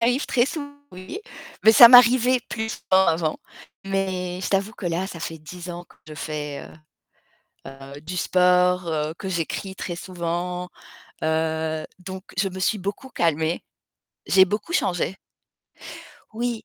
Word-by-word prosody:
Arrive 245 +4 +1
très 240 +1 +2
souvent 290 -1 -5 0.2
oui, 185 - -8 0.4
bah, 220 - +7
ça 235 +2 +11
m'arrivait 245 +1 +7
plus 220 -1 -4
avant, 170 -4 +3 0.5
mais 185 -2 -2
je - - -2
t'avoue 195 +2 0
que 200 - -6
là 175 +3 -1
ça 165 -4 -9
fait 165 -1 -5
10 175 +3 -9
ans 175 0 -7
que - - -22
je 155 - -8
fais 150 -1 -5 1.0
heu - - -6 0.3
heu, 145 - -12
du 180 +3 -6
sport, 180 0 +3
heu, 155 -1 -1
que 190 - -5
j'écris 190 +2 -3
très 175 -2 -5
souvent. 180 0 -4 0.5
Heu, 160 0 -1 0.2
donc 190 +1 -8
je 195 +1 +1
me 190 +1 -8
suis 215 +3 +1
beaucoup 205 +7 -5
calmée. 160 -4 0 0.6
J'ai 190 0 +6
beaucoup 210 - -3
changé. 180 - 0 1.2
Oui. 235 0 -3
180 Hz, 150 wpm, -23 LUFS, 165-205 Hz, 1.2 s, ça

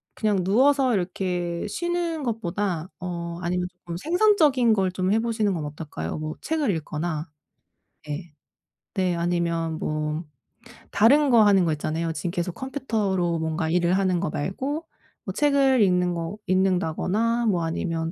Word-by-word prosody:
그냥 205 -4 +1
누워서 260 +6 +3
이렇게 180 -1 -2
쉬는 340 +4 -2
것보다 195 -6 -2
어 170 -1 -5
아니면 180 +1 -1
쪼끔 175 -1 -8
생산적인 310 - +3
걸 190 -3 +1
좀 185 +1 -1
해 220 - +3
보시는 220 -3 0
건 160 -4 -3
어떨까요? 145 - -5
뭐 155 0 -4
책을 305 -8 0
읽거나 155 +1 -4 0.8
예. 165 +2 -5 0.6
네 185 -3 +1
아니면 170 -2 -1
뭐 155 +2 -2 0.7
다른 280 +8 +5
거 230 -2 +7
하는 195 -3 +5
거 160 - +1
있잖아요. 160 +2 -2
지금 175 - -3
계속 175 0 -2
컴퓨터로 210 - -1
뭔가 160 0 -1
일을 175 0 +2
하는 185 -2 +1
거 195 - -1
말고 270 - -3 0.4
뭐 190 - -4
책을 275 -1 +3
읽는 180 -2 +2
거 170 +5 -4
읽는 185 0 +3
다거나 220 +9 0
뭐 180 -5 +1
아니면 165 0 -2
185 Hz, 290 characters per minute, -25 LUFS, 170-230 Hz, 0.8 s, 거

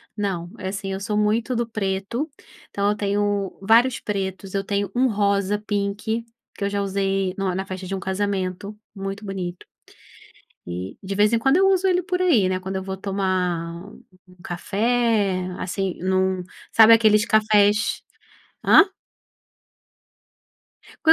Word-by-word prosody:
Não, 190 -5 -3
é 190 - -3
assim 195 0 -4
eu 190 - -3
sou 210 +1 -2
muito 220 +4 +1
do 235 0 -1
preto, 210 +6 -2 0.4
então 200 0 0
eu 210 - +1
tenho 205 -1 -1
vários 230 +5 +4
pretos, 195 -2 -4
eu 195 0 0
tenho 200 -1 -1
um 255 +2 +3
rosa 200 -2 +1
pink 210 +2 -2 0.3
que - - -5
eu 200 - +1
já 200 0 -1
usei 195 -1 -1
no 195 -2 -1
na 190 +1 -3
festa 185 0 -6
de 190 - -5
um - - -4
casamento, 190 0 -3 0.2
muito 195 +1 -5
bonito. 185 -3 -5 1.0
E 90 +2 -6
de 195 0 -4
vez 210 +2 +3
em 230 - +4
quando 270 +6 +3
eu 385 +1 +4
uso 385 0 +2
ele 365 -1 +2
por 365 0 -2
aí, 250 - +4
né, 185 0 -1
quando 190 +1 -5
eu 190 - -3
vou 190 0 -5
tomar 185 -3 -2 0.4
um 180 - -18
café, 205 0 0
assim, 190 0 -3
num 185 0 +1 0.3
sabe 225 0 +8
aqueles 215 -1 +4
cafés? 210 -1 +3 0.6
Hã? 390 - +7 2.1
Quando 320 - +7
200 Hz, 155 wpm, -23 LUFS, 190-215 Hz, 2.1 s, sabe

